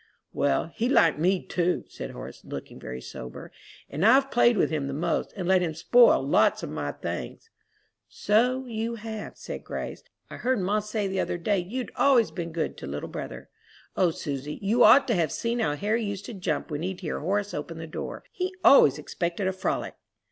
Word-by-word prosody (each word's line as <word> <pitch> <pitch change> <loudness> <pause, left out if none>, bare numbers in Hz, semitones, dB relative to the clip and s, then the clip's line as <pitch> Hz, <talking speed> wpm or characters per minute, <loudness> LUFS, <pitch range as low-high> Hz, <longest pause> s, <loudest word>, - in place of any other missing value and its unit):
"Well, 145 +3 0
he 235 +2 -1
liked 165 - +4
me, 185 +3 +2
too," 180 0 0
said - - -7
Horace, - - -9
looking - - -8
very 65 +1 -7
sober, 65 -1 -9 0.4
"and 150 +5 -3
I've 265 +5 +5
played 240 -1 +4
with - - +2
him 150 -3 -1
the 135 - -4
most, 165 +2 -1
and 185 -4 -4
let 190 -1 +4
him 165 -3 -2
spoil 240 +9 +5
lots - - +3
of - - -5
my - - -3
things." 455 - -6 0.6
"So 250 +5 +1
you 230 -1 -3
have," 220 -1 -7
said - - -7
Grace. - - -6 0.3
"I - - -9
heard 255 -1 0
ma 200 +3 +1
say 210 -1 -2
the 190 0 -2
other - - -1
day 195 +3 +1
you'd 235 +8 -4
always 255 -5 +4
been 170 -2 -5
good 160 0 -3
to 70 - -7
little 70 +2 -5
brother. - - -7 0.5
O 180 - +3
Susy, 145 -2 -5
you 225 +5 +4
ought 255 +6 +7
to 240 - +2
have 170 -5 +1
seen 235 +1 -2
how 150 -10 +1
Harry 215 +7 0
used 200 -2 -4
to 240 - -7
jump 180 -5 -3
when 150 0 -3
he'd 185 +2 -4
hear 160 - -3
Horace 200 +5 -1
open 160 +3 -5
the 165 - -6
door; 160 - -6
he 370 +1 -3
always 150 - +7
expected 170 +5 -3
a 190 - +1
frolic!" 185 - -2
190 Hz, 200 wpm, -26 LUFS, 160-230 Hz, 0.6 s, ought